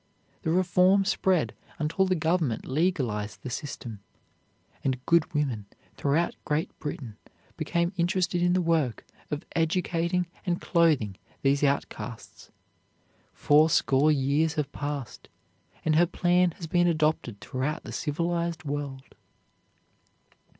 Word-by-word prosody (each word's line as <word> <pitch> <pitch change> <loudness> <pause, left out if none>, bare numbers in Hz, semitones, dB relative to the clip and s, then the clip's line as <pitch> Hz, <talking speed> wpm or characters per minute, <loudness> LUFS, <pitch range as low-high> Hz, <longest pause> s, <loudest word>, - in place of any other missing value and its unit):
The 165 - -2
reform 185 +3 +4
spread 190 -3 +1 0.2
until 170 +5 +1
the 185 - +2
Government 160 -7 0
legalized 130 - -1
the 130 - -5
system, 120 -5 -6 0.8
and 130 -1 -1
good 170 0 +3
women 130 - -1 0.3
throughout 150 +5 +1
Great 150 +1 -1
Britain 125 -7 -6 0.4
became 170 +3 0
interested 175 0 +1
in 175 0 +3
the 185 0 +2
work 160 -8 0 0.2
of 150 +3 -4
educating 170 +1 +1 0.2
and 175 -2 -1
clothing 150 - +2 0.3
these 140 +1 +3
outcasts. 140 -4 -3 0.8
Fourscore 150 -1 +4
years 150 +3 +1
have 150 -3 -2
passed, 145 -4 -5 0.6
and 155 - +3
her 175 +1 +5
plan 180 +1 +3
has 170 - -8
been 175 +2 +2
adopted 155 -9 0
throughout 135 +8 -3
the - - -8
civilized 170 +2 -2
world. 140 -2 -5
155 Hz, 115 wpm, -27 LUFS, 140-175 Hz, 0.8 s, her